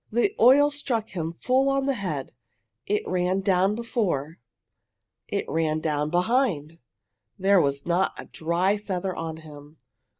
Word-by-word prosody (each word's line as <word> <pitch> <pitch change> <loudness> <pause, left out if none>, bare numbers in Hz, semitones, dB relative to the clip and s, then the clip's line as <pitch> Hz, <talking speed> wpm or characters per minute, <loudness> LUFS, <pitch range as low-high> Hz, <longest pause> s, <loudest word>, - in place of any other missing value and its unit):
The 240 - +1
oil 285 +5 +6
struck 245 -6 -2
him 165 -3 -4
full 260 +9 +1
on 275 0 +1
the 275 - +1
head. 170 - -4 0.5
It 210 +1 0
ran 185 +1 0
down 190 +1 +2
before. 195 - -2 0.9
It - - -2
ran 155 -1 0
down 150 -1 -1
behind! 175 - 0 0.6
There 195 -1 +4
was 140 -1 -1
not 175 +2 +1
a - - -8
dry 175 +5 0
feather 190 -2 -3
on 160 -1 -5
him! 150 -1 -13
185 Hz, 140 wpm, -25 LUFS, 160-225 Hz, 0.9 s, oil